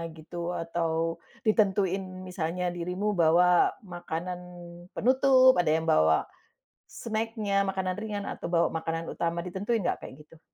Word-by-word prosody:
gitu 170 +2 -5
atau 165 0 -2 0.2
ditentuin 195 -3 +2 0.2
misalnya 180 0 -2
dirimu 180 +4 -2
bawa 175 +1 +4
makanan 175 0 -5 0.6
penutup, 260 +1 +5
ada 175 - +1
yang 160 +1 +2
bawa 80 - +4 0.6
snack-nya, 215 -3 -1
makanan 185 -1 -2
ringan 210 -2 -4
atau - - -6
bawa 170 -1 +3
makanan 165 0 -3
utama 170 0 -2
ditentuin 200 +5 -2
nggak - - -1
kayak - - -10
gitu? 165 - -18
180 Hz, 125 wpm, -28 LUFS, 165-200 Hz, 0.6 s, penutup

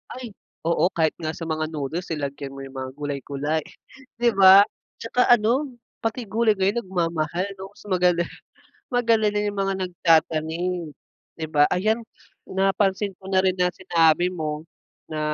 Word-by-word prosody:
Ay, 250 -3 -7 0.3
oo 170 +1 +2
kahit 160 -2 +2
nga 160 -1 -3
sa - - -7
mga 155 -1 -2
noodles, 155 +3 -4
eh, - - -1
lagyan 140 -1 -5
mo 135 - -7
yung 135 0 -11
mga 130 0 -5
gulay-gulay, 145 +1 -3 0.6
'di 240 - +4
ba? 190 0 +9 0.4
Tsaka 250 +2 +1
ano 240 +5 +2 0.3
pati 225 +2 -2
gulay 220 +2 +3
ngayon 195 +5 +1
nagmamahal, 170 -1 -1
'no? 195 +1 -9
So, - - -14
magala 180 -2 +2 0.7
magalala 225 -4 +2
yung 205 -1 -3
mga 195 0 0
nagtatanim, 165 -1 0 0.4
'di 160 - -5
ba? 145 -1 +5
Ayan, 215 +5 +1 0.4
napansin 195 +1 +1
ko 190 - -14
na 190 -1 +3
rin 185 -1 +1
na 180 0 +3
sinabi 175 -1 +3
mo 155 -4 -4 0.5
na 155 - -4
180 Hz, 155 wpm, -24 LUFS, 155-200 Hz, 0.7 s, ba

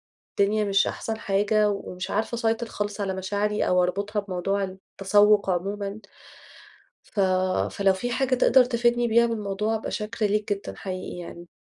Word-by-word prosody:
والدنيا 210 +1 0
مش 195 -1 +2
أحسن 225 - -3
حاجة، 210 +1 +2
ومش 185 -2 -5
عارفة 220 +3 -1
أسيطر 230 0 0
خالص 205 -1 -4
على 195 -2 -1
مشاعري، 205 +2 -1
أو 180 0 +4
أربطها 200 +4 -1
بموضوع 195 +1 -2
التسوق 195 +2 +2
عمومًا. 200 +3 -3 1.1
ف 205 - -2 0.5
فلو 195 -1 +2
في 245 +6 -3
حاجة 260 +1 +1
تقدر 255 +1 +5
تفيدني 240 0 +1
بيها 235 +1 +4
بالموضوع، 210 -1 -2
أبقى 220 - -3
شاكرة 215 0 -2
ليك 210 +1 0
جدًا 200 - -5
حقيقي 185 -2 -6
يعني؟ 175 0 -9
205 Hz, 150 wpm, -25 LUFS, 195-220 Hz, 1.1 s, تقدر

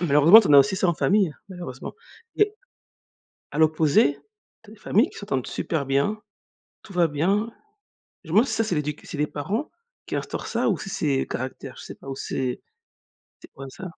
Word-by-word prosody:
malheureusement, 165 +5 +7
tu 200 - -2
en - - +4
as - - +10
aussi, 190 +7 +4
ça, 185 - +1
en 170 - +2
famille, 195 -2 +2 0.2
malheureusement 175 -9 -8 0.4
et 420 0 +2 1.0
à 150 - -4
l'opposé, 155 -2 +4 0.5
tu 215 - -16
as - - -11
des 215 - -18
familles 225 - +2
qui - - -13
s'entendent 135 - -2
super 155 -5 -2
bien. 140 +11 0 0.6
Tout 215 - -13
va 175 -2 +4
bien. 195 +10 0 0.7
Je 160 - -12
me 185 - 0
demande 235 +5 +6
si 220 - -1
ça, 225 - +1
c'est 200 -5 -1
l'éduc 150 -1 -3
c'est 150 - -7
les 150 - +1
parents 195 - -4 0.4
qui - - -3
instaurent - - -5
ça - - 0
ou - - 0
si - - -7
c'est 145 -8 -1
caractères, 130 0 -6
je - - -10
sais - - -9
pas 135 - -14
ou 135 - -5
c'est 130 -2 -3 0.8
c'est - - -14
quoi, 135 0 -9
ça? 185 - -10
160 Hz, 205 wpm, -24 LUFS, 140-205 Hz, 1.0 s, as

